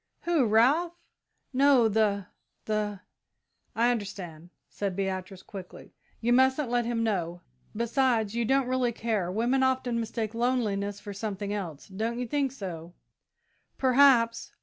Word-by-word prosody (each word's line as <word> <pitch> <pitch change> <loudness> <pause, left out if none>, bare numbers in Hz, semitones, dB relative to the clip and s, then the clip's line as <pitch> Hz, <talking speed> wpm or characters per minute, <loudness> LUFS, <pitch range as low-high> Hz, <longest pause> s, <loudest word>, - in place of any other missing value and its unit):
"Who? 335 -6 +2
Ralph?" 280 +11 +3 0.6
"No 265 -3 +5
the 205 -2 +1 0.4
the 210 -2 -2 0.4
" - - -51
"I 240 +2 +3
understand," 185 -7 -6 0.2
said 200 -3 -4
Beatrice, 190 -1 -4
quickly; 190 -3 -10 0.3
"you 240 +2 +2
mustn't 260 +1 +3
let 240 -1 +1
him 230 -1 -1
know. 175 -5 -2 0.3
Besides, 235 -2 +1
you 235 0 0
don't 270 +3 +2
really 255 -2 +1
care. 215 -6 -1
Women 240 +6 +1
often 260 -2 +1
mistake 225 -1 -3
loneliness 215 -5 -1
for 205 -1 -8
something 205 0 -4
else 175 -8 -5
don't 220 +4 -3
you 250 - -2
think 275 +2 0
so?" 175 -8 -7 0.8
"Perhaps. 255 -3 +4
225 Hz, 135 wpm, -28 LUFS, 200-250 Hz, 0.8 s, No